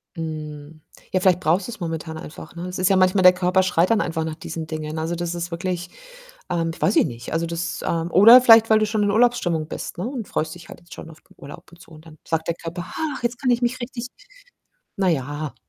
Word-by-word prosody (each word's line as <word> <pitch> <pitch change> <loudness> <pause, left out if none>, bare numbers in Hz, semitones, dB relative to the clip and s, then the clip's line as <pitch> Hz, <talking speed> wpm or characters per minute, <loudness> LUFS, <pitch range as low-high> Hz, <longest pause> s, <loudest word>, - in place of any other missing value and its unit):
Mhm. 155 -1 -7 0.3
Ja, 185 - +3
vielleicht 180 -2 +3
brauchst 180 +2 +1
du's 235 -3 -8
momentan 160 -2 -5
einfach, 160 +1 -10
ne? 175 +1 -6
Es 180 0 -6
ist 185 - +2
ja 195 - +4
manchmal 185 +1 +3
der 180 0 +8
Körper 180 +1 +1
schreit 180 -1 +2
dann 220 - +3
einfach 160 -2 -2
nach 160 -1 -4
diesen 160 0 -7
Dingen. 155 -1 -5
Also, 165 +2 -2
das 175 0 -3
ist 175 +1 -5
wirklich 175 +1 -4 0.6
ähm, 165 -1 -1
weiß 200 - +1
ich - - +5
nicht, 120 0 -7
also, 165 +1 -1
das, 170 +1 -4
ähm 165 0 -1
oder 230 +6 +9
vielleicht, 225 -2 +7
weil 220 - +5
du 215 - +2
schon 215 0 -1
in 205 - +1
Urlaubsstimmung 200 -9 +1
bist, - - -6
ne, 180 - -3
und 245 -4 -5
freust 155 0 -2
dich 170 -2 -13
halt - - -12
jetzt 175 - -14
schon - - -10
auf 155 -1 -16
den - - -25
Urlaub 140 +1 -12
und 170 - -17
so - - -17
und 155 +1 -15
dann 155 -1 -14
sagt 160 0 -2
der 170 - -1
Körper: 175 +2 -7
„Ach, 295 -6 -4
jetzt 240 +2 -2
kann 255 - 0
ich 240 0 +1
mich 245 +1 -1
richtig“ 245 -1 -6 0.9
Na 190 -2 +1
ja. 145 -1 -2
175 Hz, 245 wpm, -22 LUFS, 160-200 Hz, 0.9 s, oder